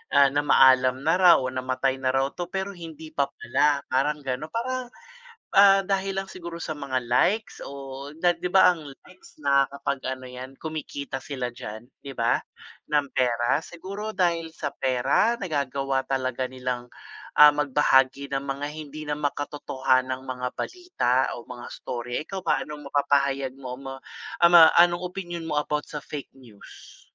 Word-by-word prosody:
ah, 140 Hz, 0 st, +7 dB
namaalam 130 Hz, -2 st, +4 dB
na 160 Hz, +3 st, +3 dB
raw 180 Hz, -2 st, +8 dB
o 130 Hz, -1 st, -3 dB
namatay 130 Hz, +1 st, -1 dB
na 130 Hz, 0 st, 0 dB
raw 135 Hz, +1 st, +1 dB
'to, 175 Hz, -, -5 dB
pero 190 Hz, +1 st, -3 dB
hindi 160 Hz, -2 st, -10 dB
pa 140 Hz, -3 st, 0 dB
pala, 140 Hz, +3 st, 0 dB
parang 150 Hz, +3 st, +1 dB
gano'n, 135 Hz, +4 st, -3 dB
parang, 255 Hz, +2 st, -2 dB, 0.7 s
ah, 195 Hz, 0 st, +8 dB
dahil 195 Hz, 0 st, -1 dB
lang 195 Hz, -, -11 dB
siguro 170 Hz, -2 st, -8 dB
sa 155 Hz, -2 st, -4 dB
mga 135 Hz, -3 st, -2 dB
likes 205 Hz, -, +1 dB
o 140 Hz, 0 st, -8 dB
na 175 Hz, -, +5 dB
'di -, -, -8 dB
ba, 190 Hz, -, +7 dB
ang 160 Hz, -3 st, -10 dB, 0.2 s
likes 180 Hz, -4 st, -18 dB
nakakapag 140 Hz, 0 st, +1 dB
ano 130 Hz, 0 st, -10 dB
yan, 130 Hz, +1 st, -9 dB
kumikita 150 Hz, -3 st, -5 dB
sila 130 Hz, -2 st, -4 dB
diyan, 110 Hz, -2 st, -8 dB, 0.2 s
'di 135 Hz, -, -6 dB
ba, 120 Hz, -1 st, +2 dB, 0.6 s
ng 145 Hz, -1 st, +3 dB
pera. 120 Hz, 0 st, +1 dB
Siguro 200 Hz, +5 st, -7 dB
dahil 170 Hz, -3 st, 0 dB
sa 150 Hz, -3 st, -4 dB
pera, 135 Hz, -, +1 dB
nagagawa 135 Hz, -5 st, -1 dB
talaga 130 Hz, -1 st, -1 dB
nilang, 125 Hz, -1 st, -4 dB, 0.6 s
ah, 150 Hz, -, +11 dB
magbahagi 140 Hz, -1 st, +2 dB
ng 135 Hz, -, -6 dB
mga 140 Hz, +1 st, -3 dB
hindi 155 Hz, 0 st, -8 dB
na 145 Hz, -, -1 dB
makatotohanang 130 Hz, -3 st, -1 dB
mga 125 Hz, 0 st, -3 dB
balita 360 Hz, -, -2 dB, 0.2 s
o -, -, -8 dB
mga 120 Hz, -1 st, -8 dB
istorya, 120 Hz, 0 st, -5 dB
ikaw 190 Hz, +5 st, -6 dB
ba, -, -, +2 dB
anong 150 Hz, -1 st, -8 dB
mapapahayag 140 Hz, -1 st, +1 dB
mo 130 Hz, -2 st, -7 dB
mo, 135 Hz, -1 st, -6 dB, 0.5 s
ah, 170 Hz, -, +7 dB
ma 165 Hz, -2 st, +9 dB
anong 175 Hz, 0 st, +5 dB
opinyon 175 Hz, -3 st, -6 dB
mo 150 Hz, -, -1 dB
about 150 Hz, 0 st, -2 dB
sa 150 Hz, -, -5 dB
fake 145 Hz, -2 st, -7 dB
news? 115 Hz, -6 st, -15 dB
140 Hz, 160 wpm, -25 LUFS, 130-165 Hz, 0.7 s, ah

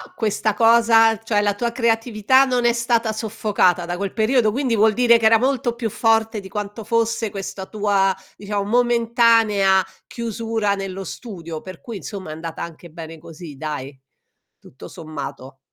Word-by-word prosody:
questa 215 Hz, -1 st, 0 dB
cosa, 225 Hz, 0 st, +5 dB
cioè 215 Hz, -2 st, 0 dB
la 205 Hz, -1 st, +1 dB
tua 235 Hz, +3 st, -3 dB
creatività 235 Hz, +2 st, +2 dB
non 250 Hz, -2 st, 0 dB
è 240 Hz, -, +4 dB
stata 235 Hz, -1 st, 0 dB
soffocata 210 Hz, -5 st, 0 dB
da 175 Hz, +1 st, -4 dB
quel 200 Hz, 0 st, -4 dB
periodo, 220 Hz, -1 st, +2 dB
quindi 255 Hz, -4 st, 0 dB
vuol 215 Hz, +1 st, +4 dB
dire 235 Hz, 0 st, +5 dB
che 225 Hz, -, -2 dB
era 225 Hz, +1 st, +6 dB
molto 245 Hz, -1 st, 0 dB
più 230 Hz, -2 st, -3 dB
forte 225 Hz, 0 st, +1 dB
di 195 Hz, -, -10 dB
quanto 210 Hz, +1 st, -6 dB
fosse 230 Hz, 0 st, 0 dB
questa 195 Hz, -1 st, -6 dB
tua, 200 Hz, -2 st, +1 dB, 0.2 s
diciamo 205 Hz, 0 st, -3 dB
momentanea 230 Hz, -4 st, +3 dB, 0.2 s
chiusura 225 Hz, -3 st, -2 dB
nello 195 Hz, 0 st, -5 dB
studio, 170 Hz, -6 st, -8 dB
per 185 Hz, +2 st, -11 dB
cui 230 Hz, -4 st, -7 dB
insomma 190 Hz, -3 st, -8 dB
è -, -, -5 dB
andata 165 Hz, 0 st, -7 dB
anche 170 Hz, +1 st, -10 dB
bene 165 Hz, 0 st, -9 dB
così 160 Hz, -3 st, -11 dB
dai, 145 Hz, -3 st, -6 dB, 0.6 s
tutto 130 Hz, -, -13 dB
sommato. 140 Hz, -5 st, -8 dB
215 Hz, 160 wpm, -21 LUFS, 190-230 Hz, 0.6 s, era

